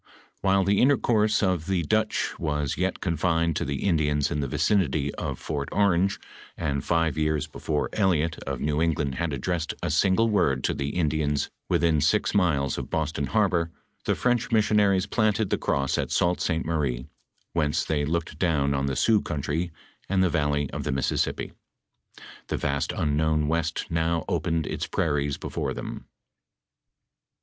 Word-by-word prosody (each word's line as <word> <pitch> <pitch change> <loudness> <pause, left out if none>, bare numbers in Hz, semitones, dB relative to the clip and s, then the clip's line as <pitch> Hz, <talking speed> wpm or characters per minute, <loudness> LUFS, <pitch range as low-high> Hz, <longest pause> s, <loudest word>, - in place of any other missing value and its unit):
While 95 0 +3
the 100 +1 +2
inter 140 +2 +5
course 110 -2 +2
of 90 -4 0
the 95 -3 +1
Dutch 110 +6 0
was 75 -3 -1
yet 95 +1 -1
confined 85 -1 +1
to - - -1
the 70 -1 -3
Indians 75 -5 +1
in 75 - -1
the 70 - -1
vicinity 75 -3 +1
of - - -4
Fort 70 -3 -4
Orange, 95 -1 +2 0.4
and 70 -4 -1
five 80 -3 +1
years 75 -1 +1
before 75 -2 -2
Elliott 85 -6 +1
of - - -2
New 75 +1 0
England 75 -4 0
had 85 -2 0
addressed 80 +4 -2
a - - 0
single 100 +4 +3
word 70 - +1
to - - +1
the 70 0 -2
Indians 75 -3 0 0.2
within 80 -3 +2
six 95 +9 +2
miles 75 -9 +1
of - - -6
Boston 75 -3 -1
harbor 90 -6 +1 0.4
the - - +1
French 125 -1 0
missionaries 105 -3 +3
planted 110 -2 +1
the - - +2
cross 70 -1 0
at - - -2
Sault 90 0 +1
Ste. 80 -2 0
Marie, 70 -7 -1 0.5
whence 75 -3 +1
they 75 -2 0
looked 80 +1 -2
down 75 -6 +2
on 70 0 0
the 65 - -1
Sioux 110 - +3
country 75 +4 -2 0.4
and 95 -1 +3
the 90 - +2
valley 75 -2 +1
of - - -4
the - - -2
Mississippi. 65 0 -1 0.9
The - - -2
vast 70 -1 -1
unknown 75 0 +1
west 80 +1 -1
now 80 0 0
opened 80 -1 0
its - - -3
prairies 70 -1 0
before - - -3
them. - - -6
80 Hz, 165 wpm, -26 LUFS, 75-95 Hz, 0.9 s, inter